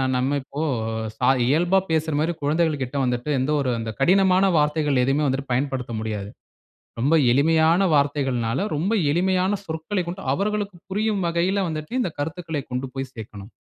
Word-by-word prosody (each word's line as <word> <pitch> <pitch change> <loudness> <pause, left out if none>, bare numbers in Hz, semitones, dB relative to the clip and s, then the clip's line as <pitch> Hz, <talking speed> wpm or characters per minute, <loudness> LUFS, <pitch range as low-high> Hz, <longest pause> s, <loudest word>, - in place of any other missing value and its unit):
நம்ம 130 +3 +1
இப்போ 140 +3 -6 0.5
சா 125 +3 +2 0.2
இயல்பா 175 +8 +3
பேசுற 160 -1 0
மாரி 165 +3 0
குழந்தைகள் 155 0 +1
கிட்ட 130 +3 -7
வந்துட்டு, 125 +3 -2
எந்த 130 +4 0
ஒரு 130 -3 0
அந்த 115 0 -4
கடினமான 185 +3 +4
வார்த்தைகள் 150 -3 +2
எதுவுமே 135 +4 +1
வந்துட்டு 135 0 -2
பயன்படுத்த 130 -2 -2
முடியாது. 105 -2 -4 0.7
ரொம்ப 145 +7 +3 0.2
எளிமையான 160 +6 +4
வார்த்தைகள்னால, 135 -2 0
ரொம்ப 180 +9 0 0.2
எளிமையான 185 +3 +1
சொற்களைக் 170 +3 -3
கொண்டு, 180 +3 -5
அவர்களுக்கு 205 +2 -2
புரியும் 210 0 0
வகையில 175 +4 +1
வந்துட்டு, 155 +2 -5
இந்த 185 - -1
கருத்துக்களை 160 -1 -3
கொண்டு 130 +1 -2
போய் 135 -1 -4
சேர்க்கணும். 105 -2 -10
150 Hz, 150 wpm, -23 LUFS, 130-175 Hz, 0.7 s, கடினமான